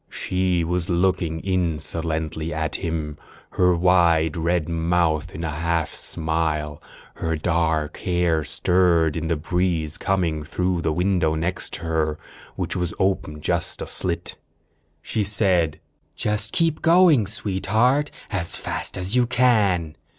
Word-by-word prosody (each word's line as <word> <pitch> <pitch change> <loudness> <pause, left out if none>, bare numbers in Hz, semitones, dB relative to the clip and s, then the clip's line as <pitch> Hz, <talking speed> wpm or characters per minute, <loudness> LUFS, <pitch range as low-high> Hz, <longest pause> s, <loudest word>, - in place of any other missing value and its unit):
She 90 -2 0
was 85 0 -2
looking 85 -2 0
insolently 80 -3 -1
at 80 -2 -2
him, 80 -4 -4 0.3
her 90 -1 +3
wide 85 -3 +3
red 85 -1 0
mouth 85 -2 0
in 80 - -5
a 80 - -2
half 80 0 -1
smile. 80 -2 -1 0.3
Her 80 0 -2
dark 80 -1 0
hair 85 -3 0
stirred 85 -1 +2
in 80 0 -3
the 85 - +1
breeze 80 -1 -1
coming 85 -5 0
through 90 +3 -1
the 80 - 0
window, 90 -1 +1
next 85 +3 -2
to - - -2
her, 80 -2 -1 0.4
which - - -3
was 90 -1 -2
open 95 -5 -1
just - - -1
a - - -4
slit. 85 -1 -2 0.7
She 110 - -1
said: 95 -6 +1 0.4
"Just 105 0 -1
keep 165 -3 +1
going, 165 - +5
Sweetheart, 110 +8 +1 0.2
as 95 -5 0
fast - - -2
as 90 +5 -1
you 125 -1 +3
can." 105 -10 +2
85 Hz, 135 wpm, -23 LUFS, 80-95 Hz, 0.7 s, going